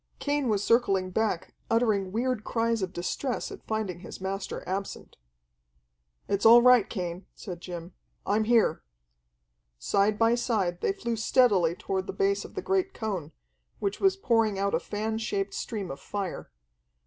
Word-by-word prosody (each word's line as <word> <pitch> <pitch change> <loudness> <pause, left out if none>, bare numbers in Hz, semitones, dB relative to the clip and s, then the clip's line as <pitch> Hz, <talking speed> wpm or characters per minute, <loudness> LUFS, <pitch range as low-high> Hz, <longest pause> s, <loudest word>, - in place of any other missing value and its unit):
Cain 285 -2 0
was 205 -2 +1
circling 195 -6 +2
back, 210 -3 -1 0.2
uttering 215 -5 +2
weird 240 +1 -1
cries 230 -1 0
of 185 -1 -2
distress 205 +8 -3
at - - -11
finding 215 -5 -2
his - - -9
master 195 +1 -4
absent. 195 +1 -5 1.1
"It's 200 0 0
all 235 +1 +8
right, 250 -4 +6
Cain," 180 -2 -5
said 175 -3 -8
Jim. 175 -1 -7 0.3
"I'm 215 +2 +1
here." 230 0 +3 1.0
Side 200 - +1
by 225 +1 +4
side 210 -8 0
they - - +2
flew 315 -13 -3
steadily 210 -7 +3
toward 190 0 -3
the - - -4
base 395 0 +1
of - - -12
the - - -4
great 385 0 0
cone, 195 -9 -3 0.5
which 200 0 -2
was 390 0 +3
pouring 225 - +2
out 200 +1 0
a - - +3
fan 220 +2 -3
shaped 200 -3 -2
stream 205 - -4
of 135 - -7
fire. 195 - -5
210 Hz, 160 wpm, -28 LUFS, 190-235 Hz, 1.1 s, all